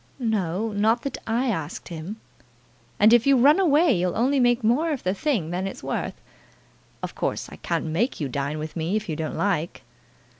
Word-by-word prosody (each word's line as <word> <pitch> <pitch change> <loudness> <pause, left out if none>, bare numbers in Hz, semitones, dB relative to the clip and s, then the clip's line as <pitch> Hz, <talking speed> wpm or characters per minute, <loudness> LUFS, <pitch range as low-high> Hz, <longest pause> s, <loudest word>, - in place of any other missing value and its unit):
"No; 215 -4 -1
not 220 +3 +1
that 275 - -4
I 240 +3 +1
asked 160 -7 -4
him." 170 +4 -6 0.8
"And 215 +3 +6
if 240 +2 +5
you 275 -1 +6
run 290 +8 +5
away 330 -3 +4
you'll 180 -1 0
only 265 +4 +2
make 245 -1 +3
more 255 +10 +2
of 290 -5 -3
the 185 - +1
thing 205 - -1
than 185 +2 -2
it's - - -8
worth. - - -3 0.8
Of - - -4
course - - -3
I - - -10
can't 165 -2 -2
make 180 - -1
you 145 - -1
dine 140 +3 -3
with 155 0 -6
me 170 +4 -1
if 215 0 -2
you 160 - -2
don't 155 0 -4
like." 175 -5 -1
210 Hz, 195 wpm, -24 LUFS, 170-245 Hz, 0.8 s, And